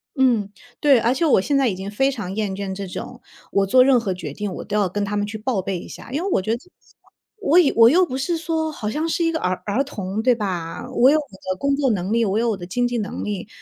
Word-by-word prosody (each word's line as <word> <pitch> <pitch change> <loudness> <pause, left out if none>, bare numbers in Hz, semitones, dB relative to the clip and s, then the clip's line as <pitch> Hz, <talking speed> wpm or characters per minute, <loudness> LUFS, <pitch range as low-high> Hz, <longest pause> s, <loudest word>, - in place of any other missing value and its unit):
嗯， 240 -7 +2 0.3
对， 275 -5 +5
而 235 +2 +2
且 285 +6 0
我 290 - +5
现 280 +7 +1
在 270 -2 +3
已 190 - -3
经 190 +2 -6
非 270 +7 +1
常 195 -6 -5
厌 210 -2 -1
倦 190 0 -4
这 200 0 -5
种 180 - -8 0.3
我 200 - +2
做 255 +6 +6
任 265 -1 +5
何 200 -5 -2
决 160 -6 -7
定 205 +2 -4
我 - - -6
都 205 - -4
要 200 -3 +2
跟 205 +3 -2
他 210 - -3
们 205 0 0
去 215 +1 -6
报 215 -2 -1
备 190 -1 -3
一 - - -10
下。 - - -11
因 295 +5 -1
为 395 - -2
我 - - +2
觉 220 +4 -1
得 - - -8 0.8
我 355 -5 +3
也 325 -6 +6
我 230 0 +8
又 360 +7 +4
不 260 -4 -4
是 330 +5 -1
说 320 -1 -1
好 215 -7 -4
像 310 +6 -1
是 335 +1 0
一 330 - +2
个 320 - -2
儿 185 -6 0
儿 210 +6 0
童 205 -6 -4
对 245 0 +3
吧？ 180 -5 -4
我 255 +1 +5
有 310 - +5
我 300 - -2 0.3
的 185 - -11
工 280 0 +1
作 280 -2 +2
能 190 -1 -2
力， 230 0 +2
我 200 +1 0
有 235 +1 +1
我 210 - -1
的 175 - -8
经 245 +7 -1
济 245 -1 -2
能 210 -2 -4
力。 205 -1 -4
225 Hz, 310 characters per minute, -22 LUFS, 195-275 Hz, 0.8 s, 我